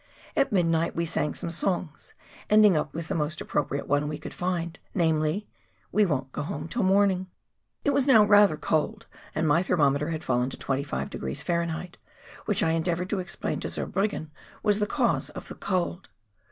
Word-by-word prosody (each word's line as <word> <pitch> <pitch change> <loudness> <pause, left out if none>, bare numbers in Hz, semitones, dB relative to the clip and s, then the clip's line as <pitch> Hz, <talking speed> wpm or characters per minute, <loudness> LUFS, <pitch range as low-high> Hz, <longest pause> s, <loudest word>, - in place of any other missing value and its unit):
At 275 -1 +2
midnight 165 -3 +2
we 170 - 0
sang 150 -2 -1
some 170 - -3
songs, 170 -1 -2 0.3
ending 210 -3 +6
up 150 -2 0
with 165 +2 -5
the - - -2
most 155 0 -2
appropriate 140 -1 -2
one 145 +1 +1
we 150 0 -3
could 155 - -8
find, 175 -1 -2 0.2
namely, 160 +2 +1 0.2
" - - -38
We 210 -1 +3
won't 135 -4 -2
go - - -4
home 170 +7 -4
till 240 - -2
morning! 190 -1 +3 0.3
" - - -46
It 285 - +4
was 280 -1 +2
now 225 -6 +7
rather 205 -5 +5
cold 205 +9 -1 0.3
and 160 - +1
my 150 +3 +4
thermometer 150 -4 +2
had 160 -1 -3
fallen 125 0 +1
to - - -7
25° 135 - -2
Fahr., 170 0 -1 0.6
which - - +2
I 160 - +2
endeavoured 170 +3 -1
to 205 - 0
explain 180 - -3
to - - -3
Zurbriggen 195 -6 -2 0.3
was 210 0 +3
the 210 - +1
cause - - +1
of - - -9
the - - -5
cold. 180 -1 -2
170 Hz, 185 wpm, -27 LUFS, 150-195 Hz, 0.6 s, now